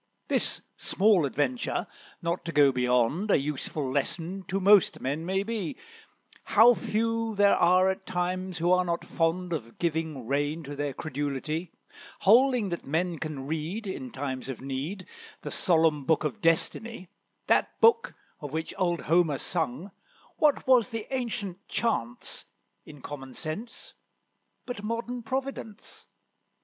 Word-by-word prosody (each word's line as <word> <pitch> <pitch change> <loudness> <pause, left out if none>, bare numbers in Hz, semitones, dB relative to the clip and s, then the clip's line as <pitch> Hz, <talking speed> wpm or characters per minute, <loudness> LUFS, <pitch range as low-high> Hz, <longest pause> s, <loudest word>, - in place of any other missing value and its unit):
This - - +1
small 195 -6 +3
adventure, 130 -2 -1 0.4
not 170 +1 -1
to 170 - -3
go 145 -3 +5
beyond, 125 - +1
A - - +5
useful 145 0 -3
lesson 165 +7 -2
to 190 +1 -1
most 200 0 +5
men 145 +6 -3
may 190 +1 +1
be; 210 -5 -4 0.7
How 230 +4 +7
few 225 0 -1
there 200 0 +5
are 185 +2 +4
at 190 0 -2
times 185 0 -2
who 170 +2 +1
are 180 0 +4
not 170 -1 -2
fond 175 +2 0
Of 115 -7 -5
giving 160 -6 -2
reins 145 +5 -1
to 145 +1 -6
their 145 -2 -3
credulity, 150 +3 -3 0.5
Holding 240 0 +5
that 170 - -4
men 165 +3 -1
can 145 -3 -5
read, 160 +9 -3
In 205 +7 -5
times 135 - -5
of 130 - -5
need, 140 +9 -4 0.4
The - - -5
solemn 160 -5 +3
Book 160 +2 +2
of 220 - -3
Destiny, 185 +5 0 0.4
That - - +1
book, 460 0 +4 0.2
of 145 -2 -7
which 160 +1 -3
old 175 -3 +1
Homer 165 -3 +2
sung, 165 +3 -2 0.5
What 300 -2 +3
was 250 -4 +5
the 225 -3 -4
ancient 220 -7 -3
chance, 120 - -2 0.4
in 150 -3 -12
common 135 -3 -8
sense, 180 +10 -5 0.7
but 245 -5 -5
modern 230 +3 -3
Providence? 255 -3 -5
175 Hz, 140 wpm, -28 LUFS, 145-210 Hz, 0.7 s, How